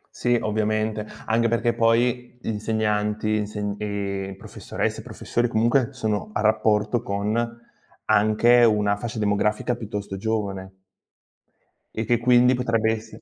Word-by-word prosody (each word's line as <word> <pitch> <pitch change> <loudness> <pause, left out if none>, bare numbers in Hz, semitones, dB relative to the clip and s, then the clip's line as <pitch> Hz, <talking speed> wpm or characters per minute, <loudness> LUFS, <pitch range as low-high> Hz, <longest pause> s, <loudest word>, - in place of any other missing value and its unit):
Sì 120 0 +1
ovviamente, 110 0 -1 0.2
anche 115 +1 +2
perché 115 +1 +1
poi 120 +2 +1
insegnanti, 105 -1 -1
inse 105 -1 -3
ehm, 100 -2 -4
professoresse, - - -4
professori 120 +1 -2
comunque 120 +3 +2
sono 110 -5 -3
a - - -1
rapporto 110 +1 +2
con 100 +3 -1 0.7
anche 110 +3 +4
una 105 -3 +3
fascia 115 +1 -5
demografica 105 +3 0
piuttosto 105 -4 -6
giovane. 95 -3 -3 1.1
E 110 - -3
che 120 +2 +2
quindi 125 +1 +5
potrebbe 115 -3 +1
esse 110 0 -7
110 Hz, 120 wpm, -24 LUFS, 105-115 Hz, 1.1 s, quindi